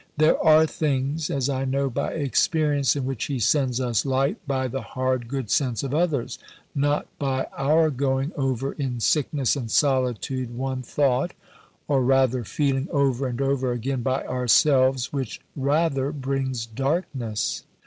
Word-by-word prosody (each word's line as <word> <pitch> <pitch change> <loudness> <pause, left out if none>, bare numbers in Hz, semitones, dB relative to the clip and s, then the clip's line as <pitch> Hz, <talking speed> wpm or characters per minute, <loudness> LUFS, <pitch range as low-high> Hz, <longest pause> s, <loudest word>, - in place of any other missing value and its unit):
There 155 +1 +3
are 160 0 +6
things, 150 0 -1
as 135 -2 0
I 135 -1 -1
know 135 +1 0
by 135 +2 -2
experience, 145 -1 +1
in 140 -3 -2
which 135 -3 -2
He 140 - -2
sends 125 +2 +1
us 120 -4 0
light 135 +1 0
by 130 -2 0
the 135 +2 -4
hard 130 -2 -2
good 130 -4 -4
sense 125 -5 +1
of 135 0 -3
others, 155 -5 0 0.3
not 145 +1 +1
by 135 -2 -1
our 155 +3 +3
going 135 +2 0
over 135 -2 -1
in 130 -5 -3
sickness 140 +1 +1
and 125 -5 -4
solitude 130 -2 0
one 130 0 -2
thought, 135 +4 0 0.5
or 135 -3 +2
rather 130 -1 +2
feeling, 135 +4 -1
over 135 -2 +1
and 120 0 -4
over 135 -2 0
again 125 +2 -2
by 130 +2 -1
ourselves, 130 +1 +3
which 135 -5 -3 0.2
rather 140 -1 +1
brings 135 -4 -2
darkness. 125 - -2
135 Hz, 150 wpm, -24 LUFS, 130-140 Hz, 0.5 s, are